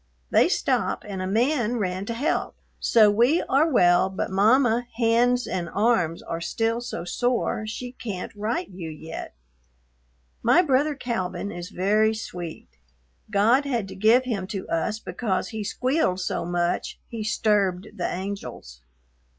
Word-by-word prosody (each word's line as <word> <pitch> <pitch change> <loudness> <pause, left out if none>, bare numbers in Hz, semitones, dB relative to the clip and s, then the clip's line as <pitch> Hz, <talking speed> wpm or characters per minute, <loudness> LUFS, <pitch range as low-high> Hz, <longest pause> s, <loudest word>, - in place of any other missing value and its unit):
they - - +5
stop - - 0
and 195 -2 -4
a 185 - -2
man 240 +3 +1
ran 190 -1 -2
to 230 - -3
help 275 +7 -1 0.2
so 215 -3 +5
we 240 +10 +3
are 295 +5 +2
well 180 - +4
but 190 - -3
mama 235 +4 +3
hands 240 +2 +3
and 175 -2 -3
arms 195 -6 +1
are 165 0 -4
still 225 +6 -1
so 240 -7 -5
sore 240 +1 -1
she 245 +3 -5
cant 210 -7 -6
write 230 - -2
you 175 -3 -7
yet. 160 +1 -8 1.1
My 355 - +5
brother 290 0 +2
Calvin 200 -6 -3
is 175 0 -7
very 215 +4 +2
sweet. 170 - -8 0.5
God 230 +7 +4
had 240 -8 -1
to - - -8
give 220 +6 +4
him 210 -7 -3
to 195 -1 -5
us 165 +6 0
because 215 -3 -2
he 220 -2 -4
squealed 250 - 0
so 180 - -2
much 175 0 -1
he 225 -2 -5
sturbed 205 -3 +1
the 175 - -1
angels. 185 - -6
215 Hz, 150 wpm, -25 LUFS, 185-240 Hz, 1.1 s, they